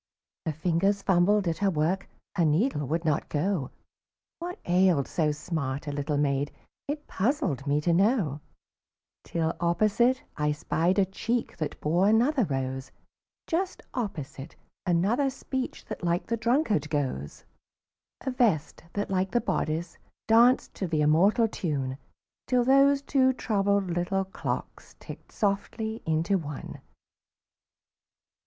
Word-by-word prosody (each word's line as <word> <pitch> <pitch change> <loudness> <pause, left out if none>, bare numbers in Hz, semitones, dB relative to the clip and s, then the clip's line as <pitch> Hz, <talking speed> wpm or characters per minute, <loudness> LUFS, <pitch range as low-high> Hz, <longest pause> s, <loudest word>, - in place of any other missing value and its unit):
Her - - +2
fingers 180 +6 +1
fumbled 190 +2 +3
at 165 -1 -1
her 200 - +3
work, 170 +3 0 0.2
Her 180 - +1
needle 155 - +1
would 165 +4 -1
not 155 -1 0
go; 160 -2 -1 0.7
What 350 +2 -5
ailed 175 -5 +3
so 155 -3 +1
smart 150 -2 -3
a 145 - -3
little 145 +1 -1
maid 140 0 0 0.4
It 295 +1 -4
puzzled 190 - -1
me 145 +1 +2
to 170 +2 +2
know, 190 - +2 0.8
Till 165 -1 -1
opposite 215 +9 +2
I 150 0 +1
spied 170 +4 0
a 200 - +4
cheek 225 +5 -2
That 155 - -4
bore 175 +6 +2
another 245 +3 +3
rose; 130 -2 -3 0.6
Just 365 +3 -2
opposite, 160 - -5 0.3
another 200 +11 +2
speech 260 0 -5
That - - -7
like 170 0 0
the 230 - -1
drunkard 230 - +1
goes; 130 - -3 0.8
A 265 - -2
vest 220 - +1
that, 205 -1 -2
like 190 0 +1
the 240 - +2
bodice, 165 +2 -2 0.3
danced 235 +3 +5
To 190 - -3
the 160 -2 0
immortal 190 +10 +4
tune, 140 -9 -3 0.5
Till 250 -1 +3
those 275 +2 +5
two 260 -2 +3
troubled 200 -5 0
little 175 +3 0
clocks 190 - -5
Ticked - - -11
softly 220 +2 -2
into 165 +5 +1
one. 150 -4 -7
185 Hz, 135 wpm, -27 LUFS, 150-225 Hz, 0.8 s, danced